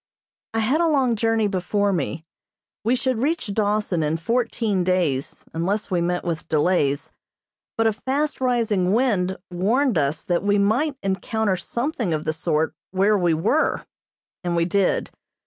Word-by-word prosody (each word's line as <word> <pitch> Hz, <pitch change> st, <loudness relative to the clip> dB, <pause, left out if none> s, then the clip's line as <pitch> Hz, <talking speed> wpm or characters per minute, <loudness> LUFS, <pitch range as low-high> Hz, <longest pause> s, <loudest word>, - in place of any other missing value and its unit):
I -, -, +2 dB
had 265 Hz, +9 st, +2 dB
a 340 Hz, -, +3 dB
long 265 Hz, -6 st, +2 dB
journey 225 Hz, 0 st, +1 dB
before 200 Hz, +1 st, 0 dB
me. 160 Hz, -1 st, -3 dB, 0.6 s
We 235 Hz, +4 st, +2 dB
should 255 Hz, -2 st, -1 dB
reach 295 Hz, -7 st, -1 dB
Dawson 205 Hz, -4 st, 0 dB
in 155 Hz, +1 st, 0 dB
fourteen 225 Hz, 0 st, 0 dB
days 175 Hz, -7 st, 0 dB
unless 190 Hz, +6 st, -1 dB
we 175 Hz, -2 st, +1 dB
met 175 Hz, +1 st, -1 dB
with 165 Hz, -3 st, -3 dB
delays, 155 Hz, -2 st, +1 dB, 0.7 s
but 225 Hz, -, +2 dB
a 220 Hz, -, +3 dB
fast 275 Hz, +6 st, -2 dB
rising 220 Hz, -7 st, +1 dB
wind 205 Hz, -7 st, +1 dB
warned 215 Hz, -, +2 dB
us 145 Hz, +2 st, -1 dB
that 175 Hz, -1 st, 0 dB
we 205 Hz, 0 st, +2 dB
might 240 Hz, +9 st, +2 dB
encounter 195 Hz, +1 st, 0 dB
something 235 Hz, -, -2 dB
of 155 Hz, -, -4 dB
the 155 Hz, -, 0 dB
sort 160 Hz, -1 st, 0 dB, 0.2 s
where 195 Hz, +3 st, +3 dB
we 175 Hz, -4 st, +2 dB
were, 275 Hz, -, +1 dB, 0.6 s
and 175 Hz, -1 st, -1 dB
we 170 Hz, 0 st, +2 dB
did. 190 Hz, +2 st, +1 dB
200 Hz, 155 wpm, -23 LUFS, 175-230 Hz, 0.7 s, a